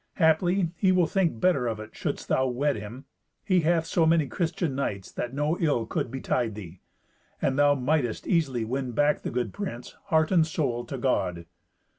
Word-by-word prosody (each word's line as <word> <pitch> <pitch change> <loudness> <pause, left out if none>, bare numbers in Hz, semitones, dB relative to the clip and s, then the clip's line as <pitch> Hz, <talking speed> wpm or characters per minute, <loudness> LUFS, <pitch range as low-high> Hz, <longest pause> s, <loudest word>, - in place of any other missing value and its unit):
Haply 175 +1 +2
he 190 0 +3
will 180 -2 +4
think 170 - 0
better 155 -8 +2
of 110 -2 -2
it 110 - -10
shouldst - - -4
thou 130 0 +2
wed 140 +4 0
him. 110 +6 -8 0.4
He 185 -3 +3
hath 165 0 +2
so 165 0 +2
many 165 -2 +4
Christian 165 0 -2
knights 100 -8 -3
that 120 - -4
no 150 +5 -1
ill 145 -9 +1
could 115 - -2
betide 120 -3 -1
thee. 90 -4 -10 0.6
And 135 - 0
thou 145 +1 +4
mightst 130 -3 0
easily 135 -10 +1
win 130 +1 -3
back 145 +5 +2
the - - -3
good 120 -3 -2
prince, 125 -12 -6
heart 160 -4 +2
and 175 -4 +5
soul, 130 -7 -2
to 135 - -5
God." 90 -9 -1
140 Hz, 185 wpm, -27 LUFS, 120-165 Hz, 0.6 s, and